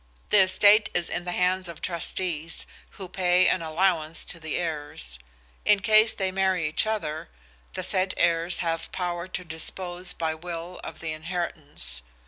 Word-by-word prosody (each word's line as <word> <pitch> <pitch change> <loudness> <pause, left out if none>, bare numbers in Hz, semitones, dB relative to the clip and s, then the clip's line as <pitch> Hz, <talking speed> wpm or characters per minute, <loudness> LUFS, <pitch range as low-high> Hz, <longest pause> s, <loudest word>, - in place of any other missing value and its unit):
The 210 - +7
estate 205 +3 +5
is 175 -1 +1
in 175 - -2
the 180 - -2
hands 180 0 +1
of 170 - -8
trustees, 170 -2 -1 0.3
who 190 - -6
pay 180 0 +3
an 185 - +2
allowance 165 -1 +1
to 170 - -4
the 160 -1 -3
heirs. 145 - -3 0.4
In 210 -1 +5
case 215 +1 +5
they 190 -2 -1
marry 190 -3 +1
each 155 +7 +1
other, 200 -8 -2 0.4
the - - -3
said 185 0 +1
heirs 170 +1 +2
have 165 0 -2
power 175 -1 -3
to 180 0 -4
dispose 175 +2 -2
by 160 -1 -1
will 170 +2 -7
of 160 - -8
the 160 -1 -3
inheritance. 155 - -5
175 Hz, 160 wpm, -26 LUFS, 160-185 Hz, 0.4 s, The